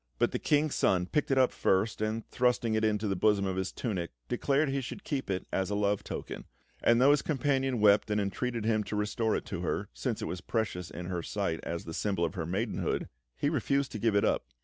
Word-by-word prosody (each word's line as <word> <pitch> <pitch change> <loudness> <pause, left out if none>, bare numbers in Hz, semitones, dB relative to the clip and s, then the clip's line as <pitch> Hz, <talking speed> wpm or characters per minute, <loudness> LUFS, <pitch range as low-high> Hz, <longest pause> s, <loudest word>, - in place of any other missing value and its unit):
But - - +2
the - - -2
King's 150 0 +2
Son 90 -2 +2
picked 150 - 0
it 135 - +2
up 130 -1 +5
first, 100 +3 +1
and 110 +1 -1
thrusting 120 -2 +1
it 110 0 +1
into 105 0 +1
the 100 - 0
bosom 100 +1 +3
of 95 -1 -1
his 95 0 -2
tunic, 95 -8 -3 0.2
declared 140 - +1
he 135 0 0
should 130 +10 -7
keep 135 -6 -3
it 95 -1 -1
as 95 0 0
a 105 - -1
love 100 -1 +1
token; - - -6 0.4
and 115 0 +4
though 135 +3 +6
his 145 - +4
companion 135 -3 0
wept 105 0 +5
and 105 0 +1
entreated 115 +3 -2
him 110 -1 +2
to - - -4
restore 105 +2 0
it - - -3
to - - -4
her, - - -2
since - - -2
it - - -3
was 90 - -4
precious 95 -6 -2
in 90 - -7
her 90 -1 -2
sight 95 -2 -2
as 85 0 -4
the 80 - -6
symbol 95 -2 0
of 80 - -3
her 80 -3 -4
maidenhood, 105 +6 -1 0.3
he - - 0
refused 140 -1 0
to 110 - -5
give 110 -1 +2
it 100 - +4
up. - - 0
105 Hz, 240 wpm, -30 LUFS, 95-125 Hz, 0.4 s, though